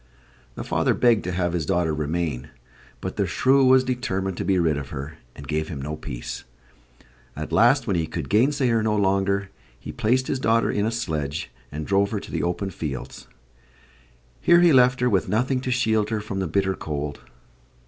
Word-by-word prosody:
The -, -, -5 dB
father -, -, +1 dB
begged 120 Hz, -3 st, +3 dB
to 90 Hz, -, -2 dB
have 90 Hz, -1 st, -1 dB
his 85 Hz, -3 st, -1 dB
daughter 85 Hz, -4 st, +1 dB
remain, 75 Hz, -3 st, -2 dB, 0.5 s
but -, -, -5 dB
the -, -, +1 dB
shrew 135 Hz, +1 st, +3 dB
was 130 Hz, 0 st, +6 dB
determined 95 Hz, -8 st, -2 dB
to -, -, -2 dB
be 95 Hz, -1 st, +2 dB
rid 80 Hz, -3 st, +2 dB
of 70 Hz, -3 st, -5 dB
her, 70 Hz, +3 st, -7 dB, 0.2 s
and 70 Hz, -, -10 dB
gave 80 Hz, 0 st, -1 dB
him 75 Hz, -, -6 dB
no 75 Hz, +3 st, -4 dB
peace. -, -, -7 dB, 0.9 s
At 75 Hz, +1 st, -6 dB
last, 120 Hz, -, +4 dB
when 100 Hz, -6 st, 0 dB
he 80 Hz, -2 st, 0 dB
could 80 Hz, -4 st, -5 dB
gainsay 130 Hz, +4 st, +2 dB
her 115 Hz, -1 st, +2 dB
no 110 Hz, -1 st, +1 dB
longer, 100 Hz, 0 st, +1 dB, 0.3 s
he -, -, -7 dB
placed 125 Hz, +4 st, +1 dB
his 135 Hz, -, -2 dB
daughter 115 Hz, -2 st, +2 dB
in 105 Hz, +1 st, 0 dB
a -, -, 0 dB
sledge 80 Hz, -10 st, -3 dB, 0.2 s
and 75 Hz, +1 st, -5 dB
drove 100 Hz, +2 st, +2 dB
her 105 Hz, -, -2 dB
to -, -, -11 dB
the -, -, -1 dB
open 95 Hz, +3 st, -2 dB
fields. 75 Hz, -7 st, -6 dB, 1.1 s
Here 170 Hz, 0 st, +5 dB
he 175 Hz, -3 st, +6 dB
left 125 Hz, 0 st, +4 dB
her, 125 Hz, -, +3 dB
with 100 Hz, -6 st, +1 dB
nothing 125 Hz, +4 st, +1 dB
to 130 Hz, -, -4 dB
shield 110 Hz, -4 st, +1 dB
her 110 Hz, -1 st, -1 dB
from 105 Hz, -2 st, -5 dB
the 95 Hz, -, -1 dB
bitter 95 Hz, +3 st, 0 dB
cold. 75 Hz, -4 st, -5 dB
95 Hz, 200 wpm, -24 LUFS, 80-120 Hz, 1.1 s, was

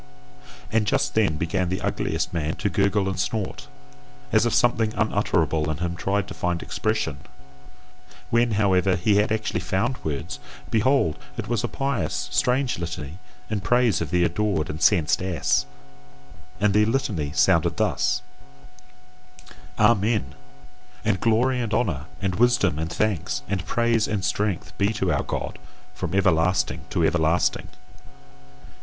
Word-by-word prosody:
And 110 Hz, -1 st, +1 dB
just -, -, +1 dB
then 105 Hz, -8 st, +2 dB
began 90 Hz, +3 st, -1 dB
the 95 Hz, -, -2 dB
ugliest -, -, -2 dB
man 80 Hz, -2 st, -1 dB
to 100 Hz, -, -2 dB
gurgle 100 Hz, +1 st, +1 dB
and 95 Hz, -1 st, -3 dB
snort, 100 Hz, +1 st, -3 dB, 0.6 s
as 120 Hz, -, +4 dB
if 115 Hz, -, -1 dB
something 120 Hz, -2 st, +2 dB
unutterable 80 Hz, -8 st, +1 dB
in 80 Hz, -, -2 dB
him 85 Hz, +1 st, -3 dB
tried 100 Hz, +3 st, -1 dB
to 100 Hz, -, -7 dB
find 90 Hz, -3 st, -2 dB
expression; 110 Hz, -9 st, -2 dB, 1.1 s
when, 115 Hz, 0 st, +3 dB
however, 95 Hz, -2 st, +3 dB
he 100 Hz, +3 st, +2 dB
had 105 Hz, +1 st, +2 dB
actually 110 Hz, -4 st, -1 dB
found 95 Hz, +8 st, -1 dB
words, 75 Hz, -1 st, -4 dB, 0.3 s
behold! 115 Hz, -, +2 dB, 0.2 s
it -, -, -4 dB
was 120 Hz, -1 st, -1 dB
a -, -, +1 dB
pious, 140 Hz, +3 st, -2 dB
strange 125 Hz, -1 st, +1 dB
litany 80 Hz, -1 st, -6 dB, 0.3 s
in 105 Hz, -1 st, -2 dB
praise 120 Hz, -3 st, +2 dB
of 80 Hz, -, -3 dB
the 90 Hz, +1 st, +2 dB
adored 85 Hz, -2 st, 0 dB
and 75 Hz, -, -7 dB
censed 85 Hz, -6 st, +3 dB
ass. 85 Hz, -7 st, 0 dB, 0.9 s
And 100 Hz, 0 st, +2 dB
the 105 Hz, +1 st, +4 dB
litany 105 Hz, -, -1 dB
sounded 85 Hz, -2 st, +3 dB
thus: -, -, +1 dB, 1.5 s
Amen! 105 Hz, -, +2 dB, 0.7 s
And 105 Hz, -3 st, +1 dB
glory 125 Hz, +3 st, +2 dB
and 110 Hz, -2 st, -1 dB
honour 85 Hz, -, -1 dB
and 95 Hz, -2 st, -1 dB
wisdom 115 Hz, -9 st, +3 dB
and 80 Hz, +1 st, -3 dB
thanks 105 Hz, -5 st, -1 dB
and 95 Hz, -2 st, -3 dB
praise 115 Hz, -2 st, +2 dB
and 100 Hz, -3 st, -2 dB
strength 105 Hz, -3 st, -2 dB
be 100 Hz, +2 st, +2 dB
to 95 Hz, -5 st, 0 dB
our 70 Hz, -, +1 dB
God, -, -, -4 dB, 0.3 s
from -, -, -4 dB
everlasting 90 Hz, -4 st, +2 dB
to 85 Hz, -, +1 dB
everlasting! 80 Hz, +1 st, +1 dB
100 Hz, 145 wpm, -24 LUFS, 85-110 Hz, 1.5 s, as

